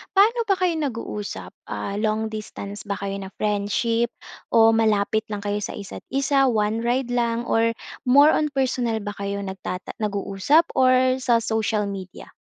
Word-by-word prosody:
Paano 455 Hz, +3 st, +4 dB
ba 390 Hz, -, +4 dB
kayo 365 Hz, -2 st, +1 dB
nag-uusap, 230 Hz, -7 st, -4 dB, 0.2 s
ah, 200 Hz, +1 st, -4 dB
long 220 Hz, 0 st, 0 dB
distance 205 Hz, -1 st, -7 dB
ba 200 Hz, -, -1 dB
kayo 195 Hz, 0 st, -4 dB
na 190 Hz, -, -6 dB
friendship 215 Hz, +3 st, 0 dB, 0.4 s
o 225 Hz, -1 st, +5 dB
malapit 220 Hz, 0 st, +1 dB
lang 205 Hz, -1 st, -5 dB
kayo 205 Hz, 0 st, -1 dB
sa -, -, -5 dB
isa't 200 Hz, -1 st, -9 dB
isa, 275 Hz, 0 st, +2 dB
one 220 Hz, -1 st, +1 dB
ride 245 Hz, +1 st, 0 dB
lang 235 Hz, -1 st, 0 dB
or 230 Hz, 0 st, +1 dB, 0.3 s
more 285 Hz, +4 st, +7 dB
on 305 Hz, -, +2 dB
personal 250 Hz, -3 st, 0 dB
ba 205 Hz, -, -3 dB
kayo 200 Hz, 0 st, -3 dB
nagtata 190 Hz, -1 st, -5 dB
nag-uusap 205 Hz, -, +2 dB
or 255 Hz, 0 st, +3 dB
sa 235 Hz, -3 st, +2 dB
social 220 Hz, -1 st, 0 dB
media? 195 Hz, -2 st, -7 dB
225 Hz, 160 wpm, -23 LUFS, 205-255 Hz, 0.4 s, more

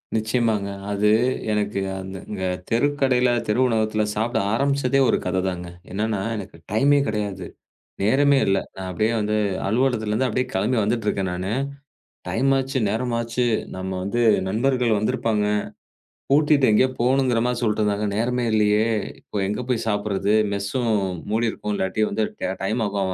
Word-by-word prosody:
நிச்சயமாங்க. 110 Hz, -2 st, 0 dB, 0.2 s
அது 105 Hz, +1 st, +2 dB, 0.4 s
எனக்கு 105 Hz, -1 st, -1 dB, 0.2 s
அந்த 95 Hz, 0 st, -5 dB, 0.2 s
தெருக்கடையில 130 Hz, 0 st, +2 dB, 0.2 s
தெரு 105 Hz, +3 st, +1 dB
உணவகத்துல 110 Hz, -2 st, +1 dB
சாப்பிட 115 Hz, +3 st, 0 dB
ஆரம்பிச்சதே 140 Hz, +1 st, +1 dB
ஒரு -, -, +3 dB
கதைதாங்க. 90 Hz, -1 st, -2 dB, 0.2 s
என்னன்னா 105 Hz, +1 st, -1 dB
எனக்கு 95 Hz, -5 st, -7 dB
டைம்மே 140 Hz, +7 st, +4 dB
கெடையாது. 105 Hz, -3 st, -3 dB, 0.6 s
நேரமே 140 Hz, +7 st, +4 dB
இல்ல. 95 Hz, 0 st, +2 dB, 0.2 s
நான் 95 Hz, -1 st, -6 dB
அப்படியே 110 Hz, +5 st, +1 dB
வந்து 105 Hz, 0 st, 0 dB, 0.3 s
அலுவலகத்துல 115 Hz, -1 st, +1 dB
இருந்து 125 Hz, +5 st, +1 dB
அப்படியே 125 Hz, +2 st, 0 dB
கிளம்பி 110 Hz, +6 st, +1 dB
வந்துட்டு 110 Hz, +1 st, -1 dB
இருக்கேன் 95 Hz, -2 st, 0 dB
நானு. 90 Hz, +2 st, -3 dB, 0.8 s
டைம் 135 Hz, +4 st, +1 dB
ஆச்சு. 135 Hz, 0 st, -2 dB
நேரம் 115 Hz, +3 st, -1 dB
ஆச்சு. 115 Hz, +1 st, -1 dB, 0.3 s
நம்ம 95 Hz, 0 st, -4 dB, 0.5 s
நண்பர்கள் 120 Hz, +1 st, +1 dB
வந்து 105 Hz, +1 st, 0 dB
இருப்பாங்க. 105 Hz, -2 st, 0 dB, 0.9 s
கூட்டிட்டு 145 Hz, -1 st, +4 dB
எங்கயோ 130 Hz, +5 st, +4 dB
போகணும்ங்கற 125 Hz, -1 st, +2 dB
மாரி 125 Hz, 0 st, +1 dB
எதோ -, -, -4 dB
சொல்லிட்டு 110 Hz, -2 st, +1 dB
இருந்தாங்க. 105 Hz, 0 st, 0 dB
நேரமே 125 Hz, +3 st, 0 dB
இல்லையே. 105 Hz, 0 st, +3 dB, 0.3 s
இப்போ -, -, -15 dB
எங்க 105 Hz, +4 st, -2 dB
போய் 120 Hz, -3 st, 0 dB
சாப்பிடுறது? 105 Hz, -1 st, 0 dB, 0.2 s
மெஸ்ஸும் 105 Hz, +5 st, -1 dB, 0.4 s
மூடி 115 Hz, +1 st, +1 dB
இருக்கும். 105 Hz, -, -4 dB
இல்லாட்டி 100 Hz, +2 st, 0 dB
வந்து 110 Hz, -, -1 dB, 0.2 s
ட -, -, -2 dB
டைம் 110 Hz, +5 st, 0 dB
ஆகும் 100 Hz, -2 st, -1 dB
110 Hz, 145 wpm, -23 LUFS, 100-125 Hz, 0.9 s, டைம்மே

